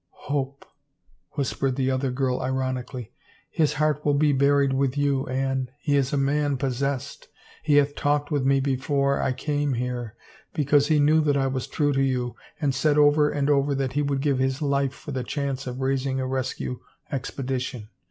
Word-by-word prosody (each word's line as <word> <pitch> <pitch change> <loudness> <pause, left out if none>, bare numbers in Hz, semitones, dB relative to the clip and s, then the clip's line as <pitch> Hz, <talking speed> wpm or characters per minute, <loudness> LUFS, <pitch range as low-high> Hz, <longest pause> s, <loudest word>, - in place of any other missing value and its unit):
" - - -51 0.2
Hope," 140 -1 -2 0.7
whispered 135 -2 -1
the 135 0 +1
other 130 +1 0
girl 125 0 -1
ironically. 130 -2 -3 0.2
" - - -34
His 150 -1 +3
heart 150 0 0
will 145 -1 +2
be 145 0 +3
buried 140 0 +3
with 135 0 0
you, 140 -2 +1
Anne. 130 0 -1
He 145 0 0
is 135 -2 +1
a 145 - 0
man 140 0 +1
pos 130 -1 -2
sessed. 140 -2 -3 0.3
He 150 -2 +2
hath 145 0 +4
talked 145 +1 0
with 145 -3 +1
me 135 0 +3
before 140 +1 +1
I - - +1
came 145 +1 -1
here, 120 -2 -3 0.4
because 145 -1 +3
he 155 -1 +3
knew 155 +2 +4
that 145 -2 +2
I 135 - +1
was 130 -1 -2
true 145 -2 0
to 135 - +1
you, 125 -2 0 0.2
and 145 -4 +1
said 145 +2 +2
over 150 0 +5
and 145 -1 -1
over 140 -1 +2
that 135 -1 -2
he 145 - +1
would 140 -2 0
give 140 -2 +1
his 130 +1 0
life 140 -2 0
for 150 - -9
the 130 -2 -2
chance 140 0 -3
of 125 +1 -5
raising 135 0 0
a 130 - -1
rescue 130 -1 -3 0.3
expedition. 130 -4 -4
135 Hz, 195 wpm, -25 LUFS, 130-145 Hz, 0.7 s, over